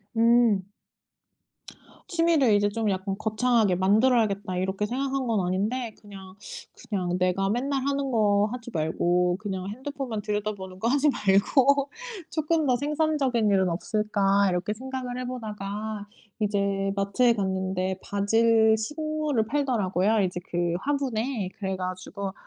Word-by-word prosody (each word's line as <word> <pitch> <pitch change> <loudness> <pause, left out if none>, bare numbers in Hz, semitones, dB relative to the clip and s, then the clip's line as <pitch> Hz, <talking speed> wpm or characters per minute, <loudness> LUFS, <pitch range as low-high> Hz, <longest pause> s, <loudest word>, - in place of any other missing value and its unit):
음. 230 -4 +4 1.5
'취미를 330 - +3
이제 205 0 +2
좀 220 0 -1
약간 195 0 -2
거창하게 220 -3 +2
만들어야겠다.' 205 -1 +2
이렇게 190 +2 -1
생각한 265 +2 -2
건 210 -5 +1
아닌데 215 +5 -1
'그냥 195 -2 -12 0.5
그냥 180 -3 -1
내가 185 +2 +1
맨날 265 +4 -1
하는 280 -1 -1
거 210 -2 +3
하지 240 -1 -7
말고 175 +3 +1
그냥 190 -3 -4
핸드폰만 260 -2 -5
들여다보는 205 -3 -4
거 230 - 0
하지 285 +3 +3
말고 270 +6 +3 0.4
쪼끔 315 0 0
더 250 - +3
생산적인 285 -6 +1
일은 190 -2 +3
없을까?' 200 +1 +1
이렇게 180 +4 -1
생각을 255 +1 -5
해보다가 215 -3 -5 0.3
이제 200 -1 0
마트에 200 +5 +2
갔는데 190 -2 -2
바질 220 +2 +3
식물을 300 -1 -1
팔더라고요 220 -7 +1
이제 180 -1 -1
그 175 -1 0
화분에. 255 -7 -1
그래 190 -1 -2
가지고 185 +2 -5
210 Hz, 295 characters per minute, -26 LUFS, 195-250 Hz, 1.5 s, 음